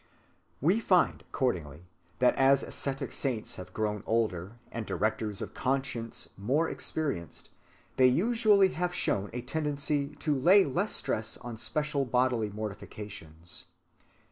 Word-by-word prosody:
(216) - - -5
We 190 +7 +5
find 185 -5 +3
accordingly 85 - -2 0.3
that 125 +1 +4
as 135 0 +5
ascetic 135 -1 -3
saints 125 -6 -2
have 90 0 -8
grown 105 0 -1
older, 105 -4 0 0.2
and 115 - -3
directors 105 -1 -1
of - - -8
conscience 130 -3 -2
more 140 +11 +2
experienced, 140 - -3 0.5
they 130 - +7
usually 205 - +4
have 175 0 -2
shown 100 - 0
a 125 - -4
tendency 145 0 -1
to 150 +1 0
lay 180 +9 +6
less 180 +10 -1
stress 110 0 -2
on 120 -1 -7
special 150 +4 0
bodily 125 -3 +1
mortifications. 100 -5 -7
130 Hz, 130 wpm, -30 LUFS, 105-150 Hz, 0.5 s, they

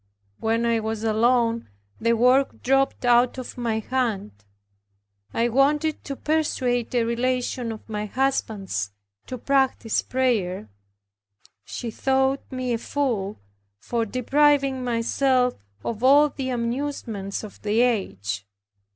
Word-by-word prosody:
When 225 +1 +1
I 230 -1 +2
was 220 0 -3
alone, 230 +1 +2 0.3
the 230 +1 +2
work 250 +4 +3
dropped 270 0 +2
out 245 +1 +4
of 255 - -7
my 235 -3 -1
hand. 225 - -1 1.0
I 235 - +1
wanted 290 +5 +2
to 275 - -4
persuade 255 -6 0
a 240 - +3
relation 245 0 -1
of 220 - -9
my 210 -1 -3
husband's 210 - -1 0.4
to 255 - -5
practice 265 -3 +1
prayer. 210 - -1 1.0
She 235 -2 -5
thought 265 +2 +1
me 255 -1 -2
a 230 - -1
fool, 230 -8 -2 0.4
for 230 - -2
depriving 270 +3 +2
myself 250 +2 +2 0.3
of 230 +1 -3
all 290 +3 +6
the 265 -2 -4
amusements 235 -5 -3
of 215 - -10
the 215 +2 +2
age. 100 - -1
245 Hz, 120 wpm, -24 LUFS, 225-265 Hz, 1.0 s, all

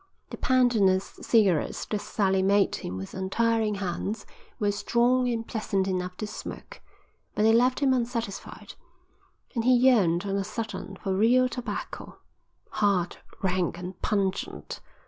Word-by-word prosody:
'" - - -44
"The - - -6
pandanus 220 -7 +2
cigarettes 200 -9 +2
that 210 -1 -3
Sally 190 -2 +1
made 200 +1 +3
him 90 - -6
with 95 +1 -7
untiring 220 +3 0
hands 200 +2 -3 0.3
were 205 -1 +2
strong 240 +4 +2
and 230 -1 -2
pleasant 200 -4 -1
enough 180 -1 -2
to 215 - -3
smoke, 210 - -8 0.5
but 210 - +1
they 220 +1 +5
left 250 +4 +3
him 270 -2 +4
unsatisfied; 235 -4 -4 0.8
and 230 - -1
he 255 +1 +5
yearned 210 -9 +4
on 195 0 -1
a 200 - 0
sudden 200 -3 -5
for 195 -2 -3
real 245 +5 +4
tobacco, 250 -1 -6 0.5
hard, 195 -4 +1 0.3
rank, 185 -2 0
and 180 +1 -8
pungent. 195 -2 -2
205 Hz, 145 wpm, -27 LUFS, 190-235 Hz, 0.8 s, they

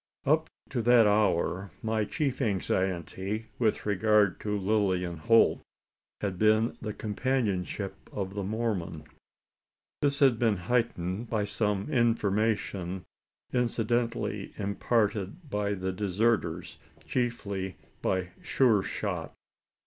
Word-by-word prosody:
Up - - +3 0.2
to 120 - 0
that 120 0 +6
hour, 100 -2 +2
my 110 -1 +1
chief 140 +1 -1
anxiety 95 0 -1
with 110 -3 +1
regard 105 -2 +3
to 105 -1 -1
Lilian 95 -4 +1
Holt 115 +8 +4 0.6
had 95 -3 -2
been 110 +1 +3
the 110 - -3
companionship 105 -3 -2
of 95 -1 -4
the 100 - -3
Mormon. 100 -7 -2 1.0
This 140 -1 +2
had 130 -6 +4
been 110 -4 +3
heightened 105 0 -1
by 105 -3 0
some 105 -1 -1
information 105 - +1 0.5
incidentally 115 -3 0
imparted 105 - 0
by 105 0 0
the 95 0 -2
deserters 105 +4 0 0.3
chiefly 100 - -2 0.2
by 95 -1 0
Sure 115 -7 +3
shot. - - -4
105 Hz, 105 wpm, -29 LUFS, 95-115 Hz, 1.0 s, that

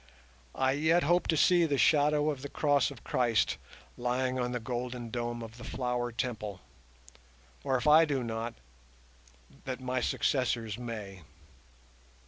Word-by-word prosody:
I 130 0 +2
yet 160 +5 +2
hope 175 +4 +2
to 160 - +2
see 175 +2 +5
the 145 -3 0
shadow 150 +1 +3
of 140 -3 -6
the 140 - -6
Cross 145 -2 +2
of - - -12
Christ 120 -3 +1 0.4
lying 125 +1 -1
on 125 0 -1
the 125 - -2
golden 120 0 -4
dome 120 0 -3
of 115 +1 -10
the - - -9
Flower 125 -1 -2
Temple; 110 -5 -4 1.0
or, 135 -1 +1
if 125 - -4
I 155 +2 +7
do 140 -4 -1
not, 115 0 -4 1.1
that 130 -1 -4
my 130 0 -2
successors 120 -5 0
may. 105 -6 -6
125 Hz, 145 wpm, -30 LUFS, 120-145 Hz, 1.1 s, I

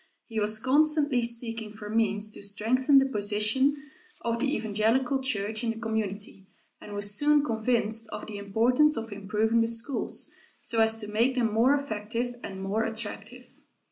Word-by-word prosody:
He 225 -2 -4
was 215 +1 +2
constantly 290 0 +3
seeking 230 -2 -1
for 210 -1 -9
means 215 -1 0
to - - -6
strengthen 230 +7 +2
the 270 - +5
position 215 +4 +1 0.4
of 235 0 -2
the 275 +2 0
evangelical 225 +5 +1
church 220 -3 0
in 235 - 0
the 225 0 -3
community 205 -3 -3 0.3
and 205 - -9
was 205 0 +2
soon 295 +5 +3
convinced 225 -2 0
of 210 - -6
the 210 -2 -7
importance 245 +9 +2
of 225 0 -5
improving 210 +3 0
the 230 - +1
schools, 235 +4 -2 0.3
so 225 -1 0
as 220 0 +3
to 210 - -6
make 230 +5 +1
them 230 -4 0
more 245 +6 +4
effective 240 -2 -3
and 190 0 -7
more 205 +3 -1
attractive. 225 +2 -4
225 Hz, 165 wpm, -27 LUFS, 210-250 Hz, 0.4 s, the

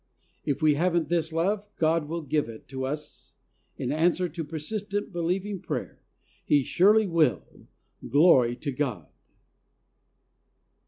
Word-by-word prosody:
If 145 +2 -1
we 155 -1 +5
haven't 170 0 +1
this 165 -1 0
love, 200 +6 -1
God 160 -1 +1
will 165 0 -3
give 150 -4 -1
it 110 -1 -11
to 130 -1 -4
us 150 +2 -6 0.4
in - - -2
answer 175 +3 +2
to 165 0 -5
persistent, 195 +7 -4
believing 185 +4 -2
prayer. - - -5 0.4
He 145 -2 +3
surely 210 - +4
will. 165 -4 +2 0.7
Glory 130 -4 +5
to 140 +3 -4
God 130 -4 -3
165 Hz, 125 wpm, -27 LUFS, 145-180 Hz, 0.7 s, we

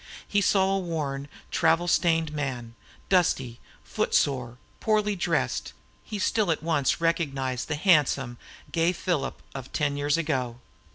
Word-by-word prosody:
He 205 - +2
saw 190 0 +3
a - - 0
worn, 150 -6 -3 0.2
traveled 165 +1 +3
stained 165 -2 +2
man; 130 -6 -4 0.3
dusty, 135 -10 +1 0.2
foot - - -1
sore, 125 -4 +1 0.2
poorly 210 -1 +1
dressed, 175 -2 -1 0.3
he 215 - -5
still 205 0 +1
at 160 -2 0
once 160 -5 +1
recognized 140 -7 -1
the 150 - -1
handsome, 145 -7 +2 0.3
gay 170 +1 +2
Philip 175 -4 -2
of 135 -1 -8
ten 145 -1 0
years 145 +2 +1
ago. 130 -7 -2
155 Hz, 135 wpm, -27 LUFS, 135-175 Hz, 0.3 s, saw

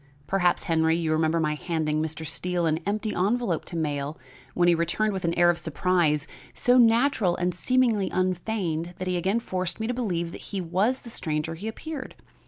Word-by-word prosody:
Perhaps, 180 -2 +1
Henry, 160 -1 +2
you 165 -2 -1
remember 160 +1 +2
my 155 -1 +1
handing 155 -1 -1
Mr. 160 0 -4
Steele 175 +2 -2
an 160 0 +1
empty 210 +1 -1
envelope 200 -2 0
to 170 - -6
mail 145 -2 -2 0.4
which 175 -1 +3
he - - +6
returned 175 +6 0
with 190 -2 -3
an 170 - 0
air 175 0 +6
of 170 - -5
surprise 160 -2 +1 0.3
so 245 +1 +4
natural 230 -5 +4
and 180 0 -1
seemingly 230 0 +2
unfeigned 180 -2 -1
that 185 - -4
he 180 - 0
again 190 +6 +1
forced 185 -4 -3
me 220 - -2
to 245 - -1
believe 175 -9 -2
that - - -9
he 200 - -4
was 190 +9 0
the 235 - -9
stranger 155 -4 -2
he 185 +7 -6
appeared. 275 +4 -6
175 Hz, 190 wpm, -26 LUFS, 160-210 Hz, 0.4 s, he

